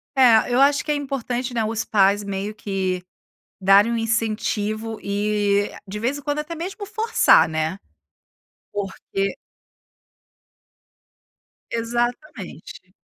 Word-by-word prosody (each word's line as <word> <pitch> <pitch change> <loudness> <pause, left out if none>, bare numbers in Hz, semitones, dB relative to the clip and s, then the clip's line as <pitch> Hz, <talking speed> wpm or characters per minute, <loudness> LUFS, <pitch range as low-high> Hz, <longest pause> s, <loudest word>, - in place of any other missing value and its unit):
É, 245 -2 +5
eu 255 - +4
acho 280 +1 +4
que 300 - -1
é 295 - +2
importante, 255 -3 -3
né, 225 - +1
os 220 0 -2
pais 200 0 +3
meio 200 +1 -4
que 190 -3 -2 0.6
darem 195 +4 +5
um 235 - 0
incentivo 220 -1 -1
e 205 0 +1 0.2
de 200 +2 -6
vez 255 +6 -1
em - - -8
quando 290 +1 -2
até 305 +3 -5
mesmo 385 +5 -5
forçar, 445 - +4
né, 160 +3 -2 0.9
porque 195 0 -3 2.3
Exatamente. 235 - -4
220 Hz, 115 wpm, -22 LUFS, 200-260 Hz, 2.3 s, É